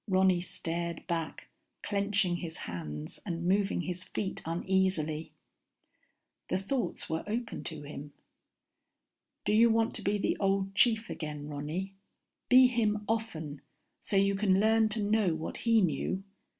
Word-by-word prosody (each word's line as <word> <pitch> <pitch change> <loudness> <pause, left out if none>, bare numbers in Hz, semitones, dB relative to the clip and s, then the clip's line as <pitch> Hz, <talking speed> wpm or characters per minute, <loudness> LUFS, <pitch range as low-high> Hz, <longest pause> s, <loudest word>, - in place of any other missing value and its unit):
Ronny 185 -2 +4
stared 170 -1 -4
back, 165 -2 -3 0.3
clenching 200 -3 +1
his 165 -2 -6
hands 75 -3 -6
and 170 -2 -3
moving 195 -1 +2
his 180 +1 -3
feet 190 0 -4
uneasily. 165 -2 0 1.2
The 185 - +2
thoughts 235 +7 -2
were 160 0 -2
open 230 +2 -3
to 155 -3 -5
him. 145 0 -8 1.3
_Do 210 - +3
you 230 +2 +7
want 225 0 +2
to - - -4
be 205 +2 +1
the 200 - 0
old 195 0 +1
chief 225 +2 +3
again, 150 -2 -5
Ronny? 155 +7 -4 0.6
Be 255 +1 +9
him 215 -4 +1
often, 165 -11 -3 0.4
so - - -2
you 200 0 +4
can 195 -1 +3
learn 220 +1 +4
to 215 0 -1
know 205 -5 +2
what 160 0 -5
he 230 -2 +4
knew? 185 +3 0
190 Hz, 140 wpm, -31 LUFS, 165-210 Hz, 1.3 s, Be